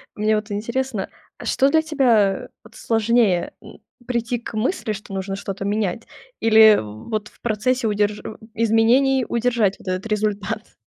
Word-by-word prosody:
Мне 215 +1 +1
вот 210 0 -4
интересно, 235 +1 -3 0.3
а - - -10
что 270 0 +2
для 315 +2 +3
тебя, 240 -11 +2
вот, 215 - -17
сложнее: 225 -5 +1
м, - - -14 0.3
прийти 240 -1 -1
к 235 - -9
мысли, 220 - -1
что 205 -1 -9
нужно 195 0 -3
что-то 195 0 -5
менять, 205 +1 -2 0.3
или 220 -1 +7
в, 110 - -9
вот, 215 -2 -2
в - - -28
процессе 235 +2 0
удерж 210 0 0
м, 215 - -8 0.2
изменений 230 +4 +3
удержать 235 -4 +1
вот - - -16
этот 185 +3 -2
результат? 210 -1 -2
220 Hz, 160 wpm, -21 LUFS, 205-235 Hz, 0.3 s, или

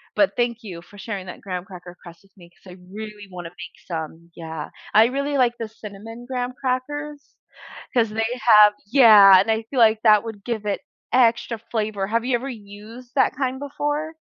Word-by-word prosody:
But 300 - +2
thank 240 -1 -1
you 180 -6 -8
for 190 +4 -17
sharing 200 -2 -6
that 180 - -10
graham 180 -2 -5
cracker 180 -2 -12
crust 170 0 -14
with 195 - -26
me 175 -2 -17
'cause 185 +1 -17
I - - -14
really 210 0 -9
wanna 175 -2 -8
make 175 0 -12
some. 165 0 -7
Yeah, 160 -2 -7 0.2
I 220 +2 +6
really 280 +3 -2
like 240 -2 +2
the 225 - -5
cinnamon 220 +2 -11
graham 250 -1 -4
crackers 285 +3 -5 0.6
'cause 235 -4 +2
they 220 +1 -2 0.2
have 210 -3 +7
yeah, 210 -6 +8
and 200 +4 0
I 220 0 0
feel 270 - -2
like 220 -1 +4
that 215 -2 +5
would 215 -3 -8
give 225 -3 -4
it 205 -1 -2 0.3
extra 235 -1 +2
flavor. 215 -3 -2
Have 230 +3 -1
you 255 -1 +1
ever 265 +3 -4
used 220 +2 -12
that 260 -1 +2
kind 260 -1 -2
before? 295 +2 -3
220 Hz, 195 wpm, -22 LUFS, 195-250 Hz, 0.6 s, yeah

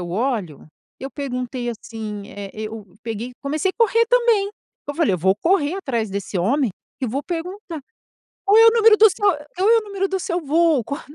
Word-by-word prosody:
eu 175 - -5
olho 205 - -2 0.3
eu 270 +1 -6
perguntei 250 -3 -4
assim, 220 -2 -6
eh, 200 -1 -8
eu 215 0 -5
o 225 - -6
o - - -22
peguei 230 +2 -5
comecei 305 +6 0
correr 460 0 +3
também. 470 -5 +3 0.4
Eu 290 - -3
falei: 320 - +2
"Eu 180 - 0
vou 190 +4 +2
correr 335 - +1
atrás 235 - -2
desse 200 -1 -4
homem 245 +6 +1 0.3
e - - +1
vou 270 +6 -2
perguntar 345 -1 -6 0.6
qual 415 +3 +6
é 455 - +8
o - - +9
número 450 -1 +6
do 440 0 +8
seu? 410 - -5 0.3
Qual 390 +4 +3
é 460 - +6
o - - 0
número 395 -1 -2
do 380 -1 -2
seu 345 -2 -2
voo? 310 -4 +3
Qual?". 280 +2 -5
280 Hz, 205 wpm, -21 LUFS, -, 0.6 s, o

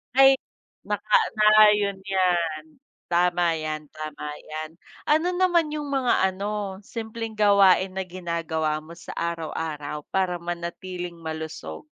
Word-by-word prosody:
Ay, 270 0 +8 0.5
naka - - +2 0.2
na 215 0 +8
yun 200 -1 +1
yan, 175 -5 +1 0.4
tama 175 -1 +2
yan, 155 -1 -4
tama 155 -1 -6 0.2
yan. 155 +1 -7 0.3
Ano 315 +4 +3
naman 350 -4 +2
yung 300 -1 -4
mga 260 -8 +2
ano 200 0 -4
simpleng 225 0 -5
gawain 200 -3 +4
na 190 - -1
ginagawa 165 -4 -2
mo 160 - -13
sa 170 0 -10
araw-araw 160 -3 -4
para 185 -2 +1
manatiling 175 +1 -5
malusog? 160 - -7
180 Hz, 120 wpm, -25 LUFS, 160-210 Hz, 0.5 s, Ay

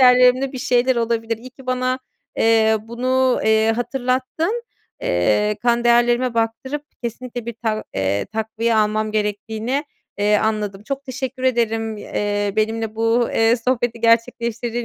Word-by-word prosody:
değerlerimde 250 +1 +5
bir 260 - -5
şeyler 245 +1 +2
olabilir. 230 -1 0
İyi 255 +3 -11
ki 265 0 -16
bana, 255 0 0 0.4
eee, 220 -1 +4
bunu, 255 +3 +1
eee, 220 0 +4
hatırlattın. 260 - -1 0.4
Eee, 105 +4 +1
kan 240 0 +2
değerlerime 240 +1 +3
baktırıp 230 +6 -2 0.2
kesinlikle 240 0 -5
bir 235 - -4
tak 215 -1 -1
eee, 95 +1 0
takviye 220 +2 -1
almam 215 0 +1
gerektiğini, 220 +6 -2 0.3
eee, 210 +1 +3
anladım. 210 -2 -1
Çok 275 +2 -4
teşekkür 260 -1 -5
ederim, 225 -3 0
eee, 205 0 -2
benimle 220 0 -1
bu, 230 +1 +2
eee, 225 +2 +4
sohbeti 240 -1 -1
gerçekleştirdiğin 235 0 +1
230 Hz, 135 wpm, -21 LUFS, 220-250 Hz, 0.4 s, değerlerimde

